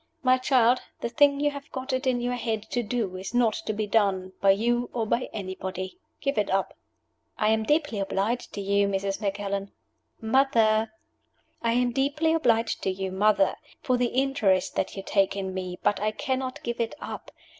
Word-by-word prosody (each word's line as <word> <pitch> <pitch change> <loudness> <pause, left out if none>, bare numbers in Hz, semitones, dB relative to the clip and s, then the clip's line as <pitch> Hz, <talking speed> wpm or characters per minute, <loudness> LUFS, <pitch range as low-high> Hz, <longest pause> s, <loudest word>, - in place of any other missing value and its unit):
My 255 0 +4
child, 255 -2 +3 0.2
the 235 - -2
thing 280 +4 +4
you 290 0 +2
have 280 +1 -9
got 260 +1 -4
it 260 0 -1
in 245 -2 +1
your 245 +1 -1
head 225 -3 -2
to 245 - +1
do 220 -4 -2
is 190 +6 -6
not 240 -3 +4
to - - +1
be 215 0 -2
done 195 -3 +1
by 195 - +4
you 240 +5 +2
or 230 -2 -1
by 235 +3 0
anybody. 190 -2 -5 0.2
Give 275 -5 0
it 205 - 0
up." 195 0 0 0.6
"I 215 - +2
am 220 0 +3
deeply 290 -2 +1
obliged 200 +5 -1
to 200 - -3
you, 200 0 +2
Mrs. 195 +1 -2
Macallan 200 -1 -2 0.3
" - - -48
"'Mother!'" 225 -2 +3 0.7
"I 230 -1 +1
am 245 0 +2
deeply 285 +5 +1
obliged 235 -8 +2
to - - 0
you, 190 0 -3
mother, 200 0 +3 0.3
for 255 - +2
the 245 0 +2
interest 240 -8 +1
that - - -2
you 195 - -4
take 195 -1 +2
in 190 -1 -3
me, 185 -1 -4
but 205 - +2
I 210 +2 +1
cannot 260 +2 -3
give 235 0 -3
it 230 -1 -1
up. - - -7
220 Hz, 195 wpm, -26 LUFS, 195-250 Hz, 0.7 s, My